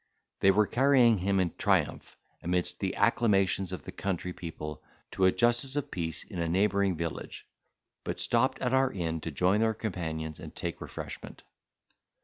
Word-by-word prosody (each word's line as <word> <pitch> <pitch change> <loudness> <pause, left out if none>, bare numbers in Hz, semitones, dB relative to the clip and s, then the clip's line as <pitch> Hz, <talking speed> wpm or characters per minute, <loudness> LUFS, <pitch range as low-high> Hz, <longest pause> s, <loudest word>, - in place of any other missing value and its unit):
They 95 - +5
were 105 +2 +4
carrying 120 -1 +4
him 95 +1 +1
in 90 -3 0
triumph, - - 0 0.2
amidst 90 0 0
the - - -2
acclamations 95 -4 +2
of 90 - -6
the - - -8
country 90 -1 -3
people, 75 -3 -7 0.3
to 95 - +1
a 95 - +6
justice 120 +5 +2
of 145 - -3
peace 80 -3 -3
in 95 - -8
a 85 -1 -1
neighbouring 100 0 +2
village, 85 -1 -5 0.6
but - - -4
stopped 125 +3 +2
at 125 0 0
our 130 0 +3
inn 80 -3 -3
to 80 - -4
join 90 +7 +2
their 110 0 +2
companions 80 -7 -4
and - - -10
take - - -4
refreshment. - - -8
95 Hz, 165 wpm, -29 LUFS, 85-110 Hz, 0.6 s, a